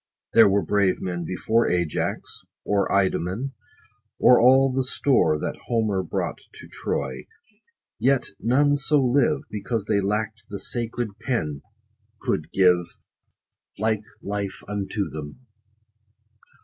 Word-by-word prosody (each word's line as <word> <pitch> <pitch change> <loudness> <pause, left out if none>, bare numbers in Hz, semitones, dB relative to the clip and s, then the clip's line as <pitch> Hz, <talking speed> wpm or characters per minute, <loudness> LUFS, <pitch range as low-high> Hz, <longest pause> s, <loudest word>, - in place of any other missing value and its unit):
There - - +7
were 100 -2 +1
brave 100 0 +2
men 85 -2 -4
before 110 +7 +1
Ajax, 85 -3 -2 0.2
or 100 -1 +1
Idomen, 100 +6 0 0.6
or 125 - +6
all 130 +2 +6
the 130 +1 0
store 130 - +2
That - - -4
Homer 110 -5 +1
brought 90 - -3 0.2
to - - -11
Troy; 65 0 -4 0.7
yet 135 -1 +1
none 145 +5 +3
so 145 +1 +2
live, 140 +3 +2
Because 105 +1 -3
they 105 -1 +1
lack'd 105 +2 -2
the 100 - -5
sacred 115 -2 -4
pen 75 - -2 0.6
could 75 +1 -2
give 90 -2 +2 0.8
Like 110 0 0 0.2
life 100 -1 -4
unto 100 0 -2
them. 75 - -9
105 Hz, 120 wpm, -24 LUFS, 95-125 Hz, 0.8 s, There